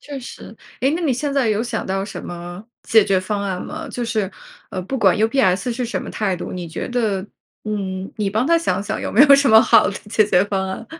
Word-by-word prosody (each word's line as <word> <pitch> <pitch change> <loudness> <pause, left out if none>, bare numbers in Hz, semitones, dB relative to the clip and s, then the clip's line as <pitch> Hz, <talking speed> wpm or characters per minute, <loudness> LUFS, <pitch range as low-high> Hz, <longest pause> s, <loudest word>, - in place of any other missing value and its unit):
确 285 -2 -7
实， 245 - -11 0.2
诶， 265 +2 +2
那 330 - -1
你 285 -5 +1
现 280 +3 -2
在 270 -5 +1
有 215 +1 +1
想 235 -2 -3
到 195 +1 -1
什 - - -8
么 175 +3 -8 0.2
解 220 -3 +4
决 195 -2 +2
方 200 +2 -3
案 190 -2 -3
吗？ 320 +1 -7
就 245 - -4
是， 215 -4 -1 0.4
呃， 185 - -4
不 265 +9 -4
管 195 -4 +4
UPS 220 -1 +1
是 245 +1 -3
什 235 - -3
么 - - -8
态 195 -4 -1
度， - - -6
你 175 -2 -6
觉 160 - -5
得， 215 -6 -1 0.4
嗯， 195 -3 -4
你 205 -2 -1
帮 220 +6 0
他 335 0 +4
想 190 - -1
想 215 +1 -4
有 - - -3
没 245 - +6
有 280 -2 +8
什 275 0 +3
么 220 0 +9
好 - - +5
的 - - -3 0.2
解 215 - +4
决 185 -1 +3
方 190 -2 -2
案。 220 +4 -6
215 Hz, 275 characters per minute, -20 LUFS, 190-245 Hz, 0.4 s, 么